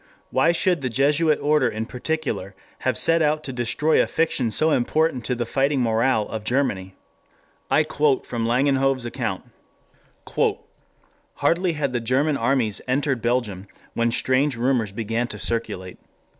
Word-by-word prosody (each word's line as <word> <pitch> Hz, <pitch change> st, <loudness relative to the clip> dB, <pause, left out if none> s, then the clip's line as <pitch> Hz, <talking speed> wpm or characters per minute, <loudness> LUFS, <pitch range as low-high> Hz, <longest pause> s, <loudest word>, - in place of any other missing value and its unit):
Why 135 Hz, +6 st, +3 dB
should 175 Hz, -1 st, +1 dB
the 130 Hz, -, -1 dB
Jesuit 150 Hz, +5 st, +2 dB
order 150 Hz, -3 st, +3 dB
in 110 Hz, 0 st, -4 dB
particular 125 Hz, -7 st, -3 dB, 0.2 s
have 130 Hz, -4 st, -1 dB
set 165 Hz, 0 st, +3 dB
out 155 Hz, 0 st, +1 dB
to 135 Hz, -, -5 dB
destroy 125 Hz, +6 st, +1 dB
a -, -, 0 dB
fiction 150 Hz, -7 st, 0 dB
so 155 Hz, +8 st, +1 dB
important 135 Hz, 0 st, +1 dB
to 125 Hz, -, 0 dB
the 120 Hz, 0 st, -2 dB
fighting 135 Hz, +3 st, +1 dB
morale 115 Hz, -1 st, +1 dB
of 110 Hz, -1 st, -5 dB
Germany? 105 Hz, -7 st, -1 dB, 0.7 s
I 155 Hz, -, +4 dB
quote 150 Hz, -2 st, +1 dB
from 120 Hz, -, -4 dB
M. 115 Hz, -, 0 dB
van 125 Hz, +4 st, +2 dB, 0.2 s
Langenhove's 135 Hz, -2 st, +1 dB
account: 115 Hz, -5 st, -3 dB, 1.9 s
"Hardly 175 Hz, +1 st, +1 dB
had 140 Hz, -4 st, -2 dB
the 120 Hz, -, 0 dB
German 135 Hz, +6 st, +1 dB
armies 125 Hz, -7 st, 0 dB
entered 135 Hz, -1 st, 0 dB
Belgium 110 Hz, -6 st, -1 dB, 0.3 s
when 115 Hz, 0 st, +1 dB
strange 130 Hz, +3 st, +1 dB
rumors 120 Hz, -4 st, +1 dB
began 115 Hz, +3 st, -2 dB
to 105 Hz, -, -6 dB
circulate. 105 Hz, -5 st, -4 dB
130 Hz, 155 wpm, -23 LUFS, 115-150 Hz, 1.9 s, I